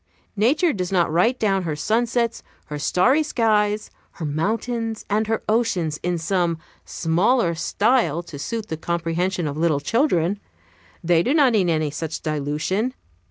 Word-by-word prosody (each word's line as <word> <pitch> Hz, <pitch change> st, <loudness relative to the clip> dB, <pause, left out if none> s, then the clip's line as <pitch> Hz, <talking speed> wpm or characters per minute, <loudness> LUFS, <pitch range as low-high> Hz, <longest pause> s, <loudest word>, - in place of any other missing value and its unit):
Nature 280 Hz, -, +2 dB
does 180 Hz, -3 st, -3 dB
not 175 Hz, -4 st, +2 dB
write 225 Hz, +10 st, +2 dB
down 195 Hz, -3 st, +1 dB
her 160 Hz, -4 st, -3 dB
sunsets, 230 Hz, +6 st, 0 dB, 0.2 s
her 150 Hz, -1 st, -6 dB
starry 250 Hz, -, +3 dB
skies, 215 Hz, -7 st, +1 dB, 0.2 s
her 165 Hz, -, -6 dB
mountains, 225 Hz, +8 st, -2 dB
and 215 Hz, +1 st, +1 dB
her 225 Hz, 0 st, -1 dB
oceans 185 Hz, -9 st, 0 dB
in 175 Hz, 0 st, -1 dB
some 170 Hz, 0 st, 0 dB, 0.3 s
smaller 175 Hz, +4 st, +1 dB
style, 175 Hz, -, +1 dB
to 160 Hz, -4 st, -10 dB
suit 215 Hz, +9 st, -4 dB
the 160 Hz, -, -3 dB
comprehension 170 Hz, +2 st, -1 dB
of 145 Hz, 0 st, -4 dB
little 160 Hz, -3 st, +2 dB
children; 200 Hz, -, +1 dB, 0.6 s
they 170 Hz, -1 st, +3 dB
do 265 Hz, -, +1 dB
not 280 Hz, -5 st, +5 dB
need 190 Hz, -5 st, +2 dB
any 155 Hz, -2 st, 0 dB
such 160 Hz, +1 st, -5 dB
dilution. 155 Hz, -, -1 dB
185 Hz, 150 wpm, -22 LUFS, 165-225 Hz, 0.6 s, not